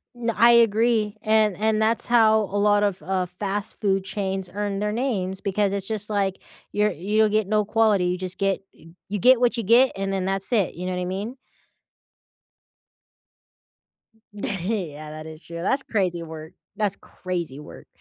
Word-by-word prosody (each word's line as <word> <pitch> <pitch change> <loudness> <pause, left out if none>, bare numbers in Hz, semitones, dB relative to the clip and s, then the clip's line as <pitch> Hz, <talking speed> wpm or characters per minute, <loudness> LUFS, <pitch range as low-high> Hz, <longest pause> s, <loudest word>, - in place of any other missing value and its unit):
N 235 -1 -1
I 235 +3 +6
agree, 225 -2 +3
and 215 -3 +3
and 220 0 +1
that's 225 +1 +1
how 220 -2 +5
a 205 0 -4
lot 205 0 +3
of, 200 -3 -1
uh, 190 -1 -1
fast 195 +3 -4
food 195 -2 +1
chains 190 -2 -3
earn 205 -1 -2
their 210 0 -1
names, 200 -6 -2
because 200 0 0
it's 195 -1 -3
just, 215 -1 -4
like, 195 -2 0 0.3
you're 210 +1 +2
you 210 +6 +1
get 215 -2 +1
no 215 0 +1
quality, 215 -3 +2
you 180 +1 0
just 185 0 -2
get 195 -1 0
y - - -18 0.2
you 205 - -2
get 250 +4 +6
what 245 -1 +2
you 230 - -1
get, 240 +6 +5
and 195 0 -2
then 190 -1 -1
that's 195 +4 -2
it, 210 -7 +2
you 180 - -6
know 185 - -2
what 180 - -2
I - - -2
mean? 200 +8 -4 3.0
Yeah, 185 -7 -3
that 155 0 -8
is 160 0 -10
true, 170 0 -7
that's 270 +9 0
crazy 185 -5 -1
work. 160 0 -9 0.2
That's 205 -3 0
crazy 170 -7 -5
work. - - -12
200 Hz, 180 wpm, -24 LUFS, 185-220 Hz, 3.0 s, I